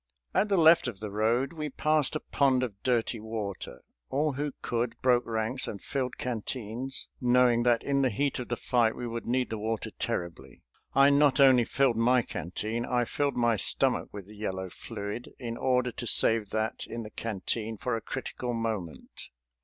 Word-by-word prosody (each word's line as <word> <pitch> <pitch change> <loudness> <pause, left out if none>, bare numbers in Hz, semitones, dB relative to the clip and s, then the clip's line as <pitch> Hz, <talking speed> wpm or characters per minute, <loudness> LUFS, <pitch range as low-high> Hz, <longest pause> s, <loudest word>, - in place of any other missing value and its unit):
At 210 - +2
the 195 - +3
left 165 -3 +6
of 110 -6 -5
the 105 -1 -5
road 115 +8 +1
we 155 -2 -4
passed 155 +2 +2
a - - 0
pond 130 -2 +2
of 100 -6 -5
dirty 120 -2 0
water. 105 - -6 0.3
All 150 +3 +1
who 145 +2 -3
could 115 0 -2
broke 125 -1 +3
ranks 115 +3 -1
and 100 - -5
filled 130 +1 -3
canteens, 125 +1 -4
knowing 125 -1 +4
that 120 -1 +2
in 140 -1 +1
the 130 - +3
heat 135 +6 -1
of 125 - -5
the 120 - -1
fight 120 -3 +1
we 120 - -5
would 115 0 -5
need 125 0 0
the 110 - -3
water 110 +1 -3
terribly. 85 -1 -5 0.3
I 140 +1 +6
not 140 -1 +4
only 130 -3 +6
filled 130 -3 +2
my 120 +2 +4
canteen, 110 +8 -4
I 120 0 0
filled 140 +3 -1
my 120 -2 +3
stomach - - +2
with 100 -2 -8
the 105 +2 -14
yellow 95 -3 -4
fluid, 105 +4 -7
in 115 -2 -5
order 125 0 +1
to 120 +1 -6
save 110 -3 +3
that 110 +1 -2
in 115 0 -5
the 105 - -9
canteen 110 +1 -3
for 125 +3 -2
a 115 - -3
critical 125 -1 -4
moment. 110 -8 -5
120 Hz, 185 wpm, -29 LUFS, 110-130 Hz, 0.3 s, left